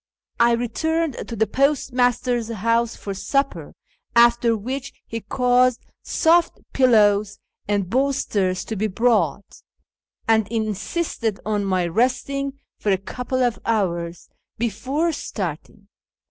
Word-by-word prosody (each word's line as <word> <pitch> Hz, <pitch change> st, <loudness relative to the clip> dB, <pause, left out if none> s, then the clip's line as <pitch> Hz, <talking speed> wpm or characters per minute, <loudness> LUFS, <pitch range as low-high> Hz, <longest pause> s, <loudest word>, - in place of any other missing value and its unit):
I 235 Hz, 0 st, +5 dB
returned 310 Hz, +6 st, -1 dB
to 230 Hz, -, -5 dB
the 220 Hz, 0 st, +2 dB
postmaster's 245 Hz, -2 st, +1 dB
house 230 Hz, +2 st, 0 dB
for 200 Hz, -, -6 dB
supper, 275 Hz, +8 st, -2 dB, 0.4 s
after 235 Hz, -1 st, +5 dB
which 260 Hz, +6 st, -5 dB
he 230 Hz, -, -5 dB
caused 250 Hz, +2 st, +2 dB, 0.2 s
soft 335 Hz, +1 st, +2 dB, 0.2 s
pillows 210 Hz, -5 st, +4 dB, 0.3 s
and 200 Hz, -2 st, 0 dB
bolsters 210 Hz, -6 st, 0 dB
to 220 Hz, -, -4 dB
be 215 Hz, +2 st, 0 dB
brought, 205 Hz, -, 0 dB, 0.7 s
and 220 Hz, -2 st, +3 dB
insisted 220 Hz, -, -2 dB
on 210 Hz, -1 st, 0 dB
my 185 Hz, -2 st, +1 dB
resting 260 Hz, +8 st, 0 dB, 0.3 s
for 205 Hz, -, 0 dB
a 190 Hz, -, +3 dB
couple 250 Hz, +6 st, -3 dB
of 240 Hz, -2 st, 0 dB
hours 175 Hz, -6 st, -1 dB, 0.3 s
before 255 Hz, -, -1 dB
starting. 195 Hz, -, -6 dB
230 Hz, 115 wpm, -22 LUFS, 205-255 Hz, 0.7 s, I